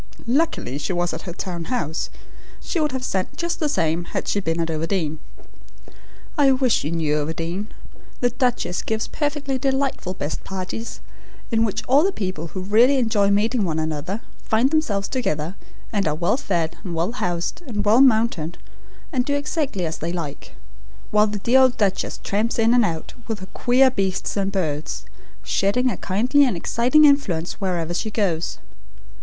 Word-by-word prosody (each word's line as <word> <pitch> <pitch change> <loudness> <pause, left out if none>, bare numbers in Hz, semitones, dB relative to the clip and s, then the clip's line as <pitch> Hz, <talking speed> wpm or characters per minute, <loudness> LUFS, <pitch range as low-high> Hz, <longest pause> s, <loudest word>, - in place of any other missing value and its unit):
Luckily 240 - 0
she 185 - -2
was 175 0 0
at - - -7
her - - -3
town 175 -2 -5
house. 160 - -2 0.5
She 350 - -2
would 300 -1 +1
have 260 -1 -3
sent 190 -5 -2
just 340 0 -2
the 305 - +1
same 170 - 0
had - - -4
she 205 - +1
been 165 -3 -1
at 165 0 0
Overdene. 160 -1 -1 1.2
I 275 -2 +6
wish 255 -3 +2
you 150 - -2
knew 155 -3 +1
Overdene. 165 +6 -3 0.5
The 245 -1 +2
duchess 245 -8 0
gives 220 0 -2
perfectly 290 -3 -2
delightful 265 -8 -1
'best 145 -3 -4
parties,' 195 +4 -5 0.5
in 225 -1 +3
which 215 -4 -1
all 275 +4 +4
the 390 - +2
people 185 - -4
who 185 +3 -6
really 230 +8 +4
enjoy 220 -5 +2
meeting 215 +3 +2
one 160 -4 -1
another 160 +6 -2 0.2
find 235 +5 +2
themselves 210 -11 +1
together, 165 - -2 0.4
and 200 -4 +1
are 150 - +1
well 170 +7 +1
fed 170 - -1
and 180 -5 -4
well 170 +6 0
housed 175 - -2
and 210 -4 -2
well 220 +5 +6
mounted, 220 - +3 0.6
and 255 -2 +2
do 285 +2 0
exactly 285 - -1
as 160 0 -4
they 165 +2 -2
like; 165 -5 -6 0.6
while 210 0 +5
the 210 0 -3
dear 240 +6 +4
old 260 -1 +4
duchess 195 -2 0
tramps 215 +4 0
in 230 +1 +4
and 245 -1 +5
out, 160 -4 -4
with 225 -2 -2
her 190 0 -9
queer 255 +2 +4
beasts 195 -6 -1
and 195 -1 0
birds, 155 -6 -2 0.4
shedding 250 +6 +1
a - - -4
kindly 245 +9 +3
and 245 -10 +1
exciting 250 - +4
influence 200 - +2
wherever 175 -3 -1
she 200 +5 -2
goes. 185 -7 -1
205 Hz, 175 wpm, -23 LUFS, 170-250 Hz, 1.2 s, I